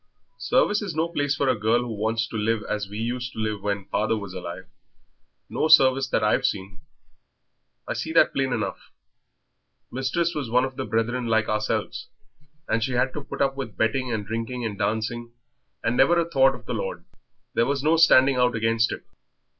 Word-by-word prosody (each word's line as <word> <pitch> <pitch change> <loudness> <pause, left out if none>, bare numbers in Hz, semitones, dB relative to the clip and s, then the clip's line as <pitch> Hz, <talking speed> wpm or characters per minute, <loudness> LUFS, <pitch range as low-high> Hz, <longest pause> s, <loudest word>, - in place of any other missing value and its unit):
"Service 210 +1 +2
is 190 -7 -5
no 160 +1 +1
place 145 -4 0
for 140 - 0
a 130 - +3
girl 110 +3 +2
who 120 -2 -4
wants 110 +2 -1
to - - -9
live 110 0 0
as 105 -2 -3
we 105 - -7
used 120 +2 -3
to - - -15
live 110 -2 -2
when 100 -1 -2
father 110 +3 0
was 100 -3 -7
alive 90 0 -7 0.8
no - - -1
service 135 -4 +6
that - - +1
I've 105 - +2
seen. 95 0 -2 1.1
I - - -1
see - - -4
that - - +5
plain - - 0
enough. - - -3 1.0
Mistress 135 +7 -1
was 145 -7 -4
one 125 +2 +3
of 130 0 -7
the - - -4
Brethren 120 +2 -1
like 110 -1 +2
ourselves, 110 0 -2 0.6
and 110 0 0
she 130 +1 -2
had 130 +1 +1
to 150 - -5
put - - -2
up 135 0 0
with 130 -6 -6
betting 130 +3 0
and 110 -3 -2
drinking 115 +3 -4
and 105 -2 -3
dancing, 110 +3 -2 0.5
and 115 +1 0
never 170 +6 +5
a 165 - 0
thought 135 -4 +3
of 120 -1 -14
the - - -4
Lord. - - -4 0.5
There 115 - +2
was 140 -1 -1
no 155 +2 +4
standing 135 -5 +5
out 125 -1 +2
against 115 0 +1
it. - - -6
120 Hz, 195 wpm, -24 LUFS, 110-135 Hz, 1.1 s, service